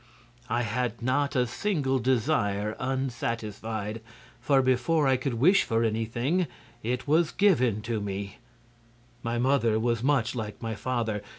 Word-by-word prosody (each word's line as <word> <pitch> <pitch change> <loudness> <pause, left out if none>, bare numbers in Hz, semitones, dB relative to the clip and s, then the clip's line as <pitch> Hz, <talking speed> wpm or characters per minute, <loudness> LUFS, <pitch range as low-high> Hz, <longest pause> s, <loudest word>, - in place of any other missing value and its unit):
I 120 +1 +1
had 120 +1 -2
not 140 +3 +1
a 125 -1 +3
single 135 - 0
desire 110 -5 +1
unsatisfied, 115 -4 -3 0.4
for 135 -2 +3
before 130 +4 +2
I 130 - +4
could 130 -1 -2
wish 170 - +5
for 115 0 0
anything 120 +10 0 0.3
it 125 +4 -2
was 160 +2 +3
given 130 - +2 0.2
me. 100 0 -5 0.8
"My 115 0 -2
mother 120 -3 +2
was 115 0 0
much 130 -3 +2
like 110 -4 -5
my 115 -1 -3
father. 115 -2 -2
120 Hz, 130 wpm, -27 LUFS, 110-135 Hz, 0.8 s, wish